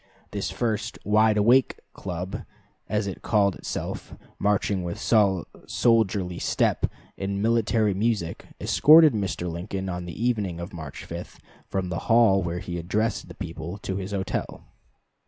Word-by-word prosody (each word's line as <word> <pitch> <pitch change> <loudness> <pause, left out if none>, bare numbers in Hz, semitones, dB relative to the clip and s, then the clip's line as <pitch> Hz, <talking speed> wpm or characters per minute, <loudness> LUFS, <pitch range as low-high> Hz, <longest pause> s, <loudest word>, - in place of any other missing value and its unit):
This 100 -1 -2
first 115 -1 -2
"Wide 105 +1 +4
Awake" 120 +5 +4 0.2
Club, 90 0 -5 0.5
as 105 0 0
it 95 - -5
called 100 -3 +2
itself, - - -5 0.2
marching 100 -2 +1
with 85 -1 -4
soldierly 100 -1 +1
step, - - +1 0.3
and 100 0 -2
military 110 -1 +2
music, 100 -4 -1
escorted 155 -1 +7
Mr. 95 -4 -2
Lincoln, 95 +3 -4
on 90 -1 -4
the 85 - -8
evening 105 -8 0
of 85 +3 -7
March 80 -5 -8
5, - - -8 0.3
from 95 -2 -2
the 85 - -2
hall 115 -4 +5
where 85 -1 -2
he 85 -1 -4
addressed 105 +6 -1
the - - -11
people, 85 0 -6
to 95 -2 -4
his 95 0 -4
hotel. 95 -2 -3
100 Hz, 140 wpm, -26 LUFS, 90-110 Hz, 0.5 s, escorted